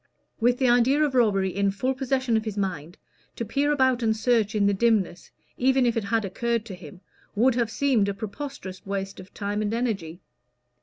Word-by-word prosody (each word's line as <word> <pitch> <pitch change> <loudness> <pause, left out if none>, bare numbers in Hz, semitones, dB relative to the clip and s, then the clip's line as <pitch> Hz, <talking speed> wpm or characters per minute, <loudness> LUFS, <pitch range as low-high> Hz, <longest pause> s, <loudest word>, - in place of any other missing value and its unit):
With 245 +1 +3
the 260 - +2
idea 245 +5 +4
of 290 -3 0
robbery 195 -7 +2
in 200 0 +2
full 230 +7 -1
possession 260 -2 0
of 220 - +1
his 215 -2 -4
mind, 175 -3 -3 0.4
to 230 - -4
peer 280 +7 0
about 260 -3 +2
and 220 -1 +1
search 220 -2 +1
in 205 -1 +2
the 200 - +3
dimness, 200 -4 0 0.3
even 260 0 +3
if 235 - +1
it 225 -3 -1
had 220 +1 0
occurred 230 +3 -2
to 210 - -8
him, 180 +1 -12 0.3
would 245 +5 +4
have 235 -2 0
seemed 230 -5 +1
a - - -1
preposterous 215 -1 -7
waste 195 0 -4
of 185 +1 -12
time 205 0 -3
and 215 +1 -1
energy. 195 -8 -3
225 Hz, 200 wpm, -25 LUFS, 200-250 Hz, 0.4 s, idea